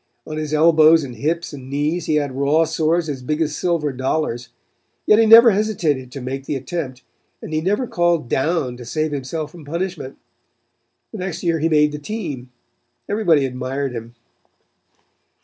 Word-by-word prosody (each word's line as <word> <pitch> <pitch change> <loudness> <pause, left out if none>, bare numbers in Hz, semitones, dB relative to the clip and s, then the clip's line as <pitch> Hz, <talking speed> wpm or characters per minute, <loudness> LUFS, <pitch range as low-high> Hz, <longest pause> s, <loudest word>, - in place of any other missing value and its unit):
On 155 - -6
his 155 -1 -4
elbows 160 0 +5
and 125 -3 -7
hips 160 +7 -2
and 130 -2 -9
knees 150 +5 -1
he 155 - +1
had 145 -2 0
raw 140 +4 +2
sores 160 +1 0
as 140 -4 -4
big 150 +5 -2
as 155 -2 -1
silver 165 -5 0
dollars; 130 -2 -2 0.6
yet 215 - +5
he 225 - +5
never 230 +1 +9
hesitated 175 -11 -1
to 140 - -7
make 135 +2 -5
the - - -1
attempt, 135 -2 -5 0.4
and - - -8
he 155 - 0
never 205 +9 0
called 175 - 0
'down' 135 -2 -1
to 120 - -9
save 155 +6 -2
himself 145 +2 -4
from 170 -2 -12
punishment. 170 -2 -5 0.9
The - - -7
next 180 -1 -5
year 165 -2 +1
he 160 +2 +1
made 150 -1 +3
the 150 - -6
team. 150 - -6 0.6
Everybody 170 -9 +2
admired 130 +1 -3
him. 115 0 -8
155 Hz, 170 wpm, -20 LUFS, 135-170 Hz, 0.9 s, never